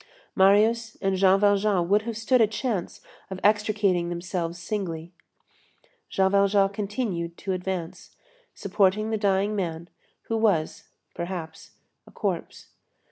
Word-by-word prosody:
Marius 215 +4 +3
and 195 -1 0
Jean 190 +1 +4
Valjean 200 -3 +2
would 205 +3 +3
have 225 - -4
stood 235 +2 +2
a 220 - +5
chance 215 -3 -3 0.3
of 190 -1 -6
extricating 205 -4 +2
themselves 175 -1 -4
singly. 175 -3 -5 1.0
Jean 190 0 +2
Valjean 200 0 +3
continued 200 -4 -3
to 195 - -4
advance, 180 -2 -5 0.4
supporting 200 +2 +1
the - - +1
dying 200 0 +1
man, 170 -3 -4 0.3
who 225 - -2
was, 200 -8 0 0.3
perhaps, 170 -2 -7 0.3
a - - -15
corpse. - - -4
195 Hz, 125 wpm, -25 LUFS, 175-210 Hz, 1.0 s, a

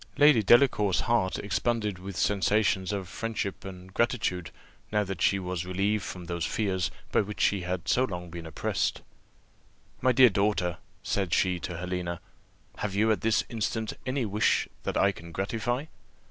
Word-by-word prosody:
Lady 145 -6 +6
Delacour's 105 -4 +4
heart 120 -7 +1
expanded 105 0 -1
with 95 0 -7
the - - -1
sensations 100 -1 +2
of 100 -3 -3
friendship 105 0 -4
and 95 -1 -10
gratitude, 105 -8 0 0.4
now 105 -1 +2
that 95 -4 -5
she 100 - +4
was 90 -2 -3
relieved 100 +4 0
from 90 -1 -7
those 85 -1 -3
fears 95 -1 0 0.2
by - - +4
which 105 0 -6
she 100 -2 +2
had 90 0 -3
so 125 - +3
long 90 -5 -6
been 85 -1 -7
oppressed. 80 - -1 1.0
"My 130 - +4
dear 125 0 +7
daughter," 100 -3 0 0.2
said 95 -4 0
she 90 -2 +2
to 85 0 -5
Helena, 90 -1 -3 0.6
"have 100 -2 -3
you 110 +2 +3
at 110 - 0
this 110 -1 +2
instant 110 -1 -2
any 130 -1 0
wish 105 +1 +2 0.2
that - - -1
I 100 - +4
can 85 -2 -11
gratify? 115 - -2
100 Hz, 165 wpm, -28 LUFS, 90-110 Hz, 1.0 s, dear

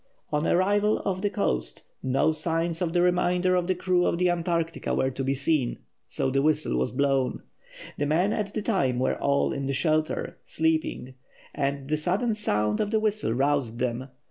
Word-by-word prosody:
On 150 +1 0
arrival 205 +4 +2
off 185 -1 -1
the 205 - +1
coast 60 - -2 0.2
no 130 +4 +2
signs 165 +2 -1
of 170 -2 0
the 175 0 +2
remainder 180 0 +2
of 180 -1 +1
the 185 - +1
crew 180 0 +1
of - - 0
the 180 0 +3
Antarctica 170 -1 -1
were 130 - +1
to 135 +1 -4
be 135 +1 0
seen, 140 -2 0 0.3
so 135 - -1
the 135 +1 +2
whistle 150 - +1
was 65 +1 0
blown. 135 -1 0 0.6
The 145 - +1
men 175 +8 +2
at 205 -2 -3
the 215 - -2
time 140 - +1
were 130 - +1
all 140 0 +2
in 140 -1 -3
the 140 - -1
shelter, 155 +3 0
sleeping, 160 -5 -1 0.4
and 140 -1 -2
the 155 +1 0
sudden 190 +9 0
sound 105 - 0
of 205 - -1
the 220 0 +2
whistle 215 - 0
roused 135 -3 0
them. 125 +1 -2
155 Hz, 190 wpm, -26 LUFS, 135-180 Hz, 0.6 s, the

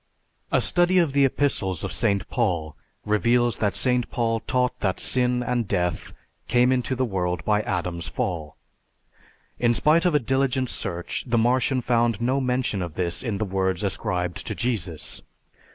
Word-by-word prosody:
A - - +3
study 175 +1 +2
of 165 -6 +3
the 140 -1 +4
Epistles 110 - 0
of - - -3
St. 100 -5 0
Paul 80 -4 -1 0.3
reveals 120 +3 +2
that 105 -2 0
St. 125 -2 +2
Paul 115 -1 0
taught 125 +2 -1
that 95 -3 -1
sin 125 -1 +1
and 120 -3 -1
death 90 -3 -1 0.4
came 125 +1 +3
into 130 0 0
the 130 +1 0
world 90 -6 -2
by 105 0 +2
Adam's 85 -3 -3
fall. 85 -3 -3 1.0
In 120 -1 +3
spite 160 +6 +3
of 175 -4 +3
a - - +5
diligent 130 0 0
search 85 -2 -4
the 120 -1 +1
Martian 125 +3 +2
found 120 -2 +1
no 130 +4 +1
mention 125 -6 -1
of 85 -3 -5
this 85 -2 -1
in 110 -5 -2
the 110 - -1
words 95 -1 -1
ascribed 90 -3 -2
to - - -3
Jesus. 95 -10 -2
115 Hz, 165 wpm, -24 LUFS, 95-125 Hz, 1.0 s, a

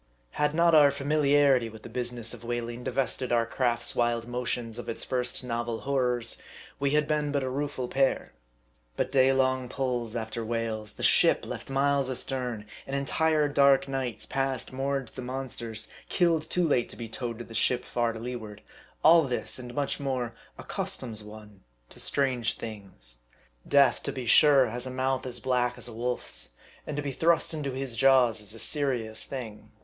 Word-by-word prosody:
Had 150 +1 0
not 170 0 +4
our 150 -2 +8
familiarity 140 -3 +3
with 110 -1 -13
the - - -8
business 120 -2 -2
of 120 -1 -10
whaling 120 0 -4
divested 130 -1 -1
our 120 -1 +3
craft's 120 -1 0
wild 120 -1 0
motions 120 -2 -3
of - - -6
its 115 - -2
first 125 0 -1
novel 120 -2 -3
horrors, 125 -4 +1 0.4
we 140 0 +1
had 150 -1 +2
been 150 -1 0
but 140 -1 0
a 130 - -2
rueful 135 -2 -3
pair. 135 +1 0 0.6
But - - -1
day 135 -1 +5
long 130 -1 +1
pulls 125 -4 -2
after 115 0 -3
whales, 110 -2 -3
the - - -8
ship - - +5
left - - -7
miles 135 0 +1
astern; 125 -4 -3 0.2
and 135 - -3
entire 150 +2 +2
dark 140 -1 +4
nights 135 -4 -2
passed 135 -1 -1
moored 135 0 -1
to - - -18
the 130 - -5
monsters, 125 -3 -4 0.2
killed 165 -3 +2
too 180 -2 +2
late 125 -5 +1
to - - -9
be 115 - -6
towed 115 0 -4
to 120 - -7
the 115 - -12
ship 125 +2 +1
far 120 -1 0
to 115 - -8
leeward: 110 -3 -7 0.4
all 165 +2 +8
this, 125 0 -3
and 125 -1 -8
much 145 0 -1
more, 130 -4 -2 0.2
ac - - -10
customs 110 -4 -4
one 105 -2 -13 0.3
to - - -11
strange 130 -5 0
things. 95 - -6 0.5
Death, 140 -3 +4
to - - -2
be 130 -2 -5
sure, 140 +2 +6
has 120 +2 -3
a - - -4
mouth 130 0 -1
as 120 -1 -1
black 125 0 0
as - - -4
a 120 - -9
wolf's, 110 - -3 0.3
and 150 - -4
to 145 - -2
be 140 - -2
thrust 165 +4 +2
into 145 -4 -3
his 130 -2 -4
jaws 125 -3 +4
is 105 +1 -3
a - - -9
serious 120 -5 +1
thing. 115 -6 -7
125 Hz, 185 wpm, -28 LUFS, 115-140 Hz, 0.6 s, our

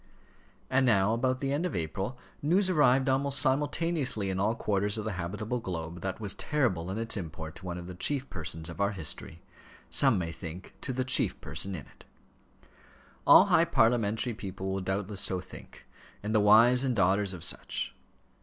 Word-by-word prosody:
And 130 0 +2
now 110 -4 +3
about 130 +2 0
the 135 0 0
end 150 +4 0
of 180 - -2
April 95 +9 -3 0.2
news 185 +6 +2
arrived 135 -5 +4
almost 135 +1 +2
simultaneously 145 - 0
in 95 - -2
all 110 +4 +1
quarters 105 -1 0
of 110 - -4
the 110 - -2
habitable 105 +6 -3
globe 85 -4 -5
that 95 -1 -4
was 105 -3 -2
terrible 115 - -1
in 95 - -3
its 115 0 -2
import 80 -3 -6
to 95 - -9
one 90 -1 -4
of 90 - -7
the 90 - -7
chief 135 +9 -1
persons 80 -1 -6
of 85 +3 -6
our 100 +1 +1
history; 80 -1 -6 0.5
some 135 -6 +4
may 85 -2 -2
think 85 +2 -9
to 130 - -3
the 130 0 -1
chief 130 - +2
person 95 0 -4
in 75 - -7
it. - - -19 1.2
All - - +9
high - - +4
parliamentary 115 0 +2
people 95 -2 -5
will 95 0 -2
doubtless 95 +2 -2
so 95 - +1
think, 90 - -12 0.4
and 105 +1 -2
the 110 - +4
wives 115 +5 +6
and 130 -3 0
daughters 95 0 +2
of 90 -4 -6
such. - - -2
105 Hz, 185 wpm, -29 LUFS, 95-130 Hz, 1.2 s, All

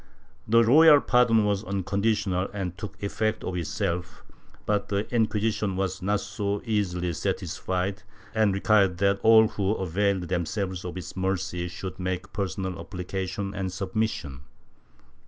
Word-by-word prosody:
The 115 +1 +5
royal 150 +5 +7
pardon 120 -5 +3
was 100 0 0
unconditional 100 0 0
and 90 -3 -3
took 105 +1 -9
effect 110 +2 -1
of 90 - -3
itself, 85 +1 -3 0.4
but 105 -1 0
the 100 0 0
Inc{uisition 110 -3 0
was 95 0 -2
not 100 +2 0
so 105 -1 -2
easily 90 -6 -1
satisfied 95 +5 -2 0.3
and 110 -2 +3
required 100 -2 +3
that 100 +1 +2
all 110 0 +7
who 100 0 -1
availed 95 +1 0
themselves 90 +2 -2
of 90 +1 -5
its 90 - -7
mercy 95 -1 -2
should 95 +2 -7
make 95 +1 -3
personal 95 -3 -3
appli 90 -1 -7
cation 100 +1 -3
and 95 -2 -3
submission. 95 -6 -3
100 Hz, 135 wpm, -26 LUFS, 90-105 Hz, 0.4 s, royal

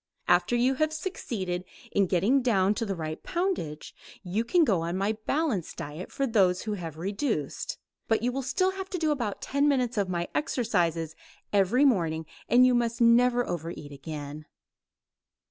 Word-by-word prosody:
After 175 +7 +3
you 250 +2 +3
have 310 0 +3
succeeded 215 - -3 0.3
in 200 -2 +2
getting 200 +10 +3
down 205 -5 +3
to 225 +1 -3
the 195 - -2
right 155 -2 -5
poundage 345 - -2 0.3
you 195 +5 -1
can 335 +9 +3
go 200 - +2
on 170 +2 -2
my 200 +2 +1 0.2
balanced 275 - -1
diet 150 +5 -6
for 275 - -1
those 190 -7 +2
who 215 - -2
have 165 -6 -6
reduced, 195 - -2 0.3
but 225 0 +1
you 245 - +2
will 270 +2 -2
still 370 +9 +1
have 385 0 -6
to 365 - -3
do 315 -3 +1
about 235 -9 -2
ten 280 +1 +1
minutes 250 -5 +1
of 195 -2 0
my 175 -1 -1
exercises 170 - 0 0.4
every 205 +8 +4
morning, 165 - +2 0.2
and 250 +1 +7
you 255 - +4
must 235 -1 0
never 245 +1 +4
over 165 -1 -3
eat 145 -4 -8
again. 145 +1 -7
210 Hz, 175 wpm, -28 LUFS, 175-255 Hz, 0.4 s, and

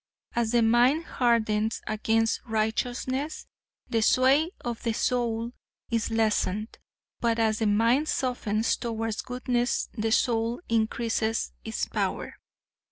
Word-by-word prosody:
As 235 -1 0
the 235 -1 +4
mind 245 +8 +4
hardens 220 -4 +1
against 225 +1 +1
righteousness 245 +6 -2 0.4
the 225 - 0
sway 265 +8 +4
of 235 -2 -4
the 230 - -1
soul 235 -1 0 0.4
is 230 -2 0
lessened, 215 -1 0 0.4
but 230 -1 +1
as 220 -1 +1
the 220 - +1
mind 230 +8 +3
softens 225 -4 0
towards 225 -2 -3
goodness 245 -1 -1
the 225 -1 -1
soul 230 0 +1
increases 225 - 0
its - - -2
power. - - -2
230 Hz, 115 wpm, -27 LUFS, 220-245 Hz, 0.4 s, the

